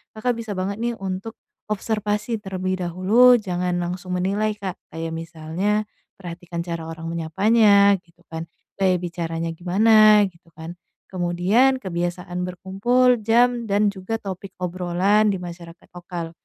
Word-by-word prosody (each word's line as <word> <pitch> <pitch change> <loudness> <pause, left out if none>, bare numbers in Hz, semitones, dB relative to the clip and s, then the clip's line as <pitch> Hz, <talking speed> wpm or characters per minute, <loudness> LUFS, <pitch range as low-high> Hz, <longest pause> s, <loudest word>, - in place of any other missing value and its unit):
Kakak 240 +2 -1
bisa 225 -2 -6
banget 190 +2 -2
nih 235 0 -1
untuk 195 +2 -5 0.3
observasi 215 +2 -2
terlebih 185 -1 -3
dahulu. 215 +9 +5
Jangan 180 -4 -1
langsung 180 +1 -4
menilai 205 +3 0
Kak, 195 -3 -6
kayak 165 0 -5
misalnya 165 +6 -2 0.3
perhatikan 175 -2 -7
cara 170 -2 -5
orang 165 0 -6
menyapanya 200 +4 +4
gitu 175 0 -28
kan, 160 +1 -5 0.3
gaya 190 -1 +3
bicaranya 165 -1 -4
gimana, 210 +5 +5
gitu 170 0 -27
kan. 165 +2 -9 0.3
Kemudian 185 +9 +2
kebiasaan 175 0 -3
berkumpul, 235 +8 +2
jam, 235 +2 +2
dan 205 0 +2
juga 195 +3 -5
topik 195 -2 -7
obrolan 185 +4 +1
di - - -1
masyarakat 170 -1 -11
lokal. 175 -2 -7
185 Hz, 130 wpm, -22 LUFS, 175-210 Hz, 0.3 s, dahulu